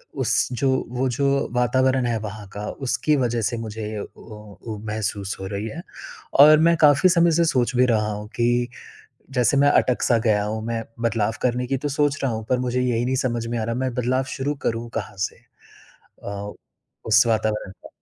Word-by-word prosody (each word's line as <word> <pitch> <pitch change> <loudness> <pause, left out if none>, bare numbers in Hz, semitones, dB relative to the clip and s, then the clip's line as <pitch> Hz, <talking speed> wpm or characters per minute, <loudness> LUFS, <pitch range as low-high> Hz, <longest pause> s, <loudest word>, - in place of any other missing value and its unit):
उस - - -1 0.3
जो 135 - +2 0.2
वो 125 +2 0
जो 135 +3 -1 0.3
वातावरण 130 +1 +2
है 115 -1 0
वहाँ 105 -1 -7
का 105 +1 -5 0.2
उसकी 150 +4 +1
वजह 120 -3 0
से 120 - -3
मुझे 110 -1 -6
अ - - -3
अ, 105 -1 -10
महसूस 105 -2 -3
हो 95 - -4
रही 100 +2 -4
है 160 +10 -7 0.6
और 155 +2 +9
मैं 170 - +4
काफ़ी 150 +4 +5
समय 170 -1 +4
से 170 +1 +3
सोच 130 -5 +1
भी 125 +1 +4
रहा 110 -3 +1
हूँ 105 0 -7
कि 120 +1 +1 0.7
जैसे 125 +3 +3
मैं 145 +1 +5
अटक-सा 125 -3 +2
गया 105 -2 +3
हूँ, 110 +1 -3
मैं 115 -1 -2 0.2
बदलाव 115 -2 0
करने 125 0 0
की 135 +1 0
तो 145 - -3
सोच 145 0 0
रहा 135 - +1
हूँ, 110 0 -4
पर 125 -1 +2
मुझे 125 0 -1
यही 120 -1 0
नहीं 130 +1 0
समझ 120 -2 -1
में 120 0 -2
आ - - -1
रहा 115 +1 -2
मैं 130 0 -2
बदलाव 130 +1 0
शुरू 145 +2 -2
करूँ 115 +1 -1
कहाँ 100 -2 -6
से? 95 - -2 0.9
अ, 100 0 -6 0.5
उस 110 +1 +5
वातावरण 110 -3 0
का। - - -15
120 Hz, 195 wpm, -23 LUFS, 110-130 Hz, 0.9 s, और